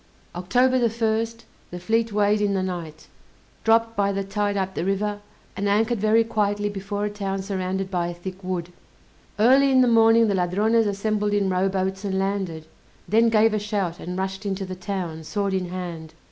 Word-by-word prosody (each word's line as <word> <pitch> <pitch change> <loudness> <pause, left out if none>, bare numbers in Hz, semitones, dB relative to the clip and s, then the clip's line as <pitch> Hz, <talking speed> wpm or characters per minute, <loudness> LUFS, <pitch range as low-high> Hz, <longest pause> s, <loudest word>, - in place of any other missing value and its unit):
October 250 +9 +2
the 240 - +3
1st, 225 0 -1 0.3
the 180 - -7
fleet 225 +5 0
weighed 205 0 +2
in 200 -1 +1
the 190 - 0
night, 170 -4 -6 0.6
dropped 225 0 +3
by 200 -1 +1
the 195 0 -2
tide 205 +1 -1
up 190 -1 -2
the - - -3
river, 205 +2 -1 0.4
and 200 +1 -1
anchored 220 +3 +1
very 215 +2 +4
quietly 205 -2 0
before 205 +1 -4
a - - -1
town 195 -2 -3
surrounded 190 -1 -3
by 175 -2 0
a 175 - -4
thick 185 +2 -8
wood. 180 -1 -4 0.6
Early 265 +6 +5
in 260 -1 +5
the 250 - +4
morning 225 0 +5
the 205 - +1
Ladrones 205 +5 +2
assembled 205 +1 -1
in 200 -2 +1
rowboats 190 +1 -1
and 190 -2 -1
landed; 190 -5 -2 0.4
then 230 +2 +4
gave 220 0 +4
a 215 - +1
shout, 200 -4 -2
and 180 +1 -5
rushed 190 +1 -3
into 195 -1 -3
the 185 - -6
town, 180 -4 -5
sword 200 +3 -2
in 185 -2 -1
hand. 170 -3 -6
200 Hz, 190 wpm, -24 LUFS, 185-215 Hz, 0.6 s, Early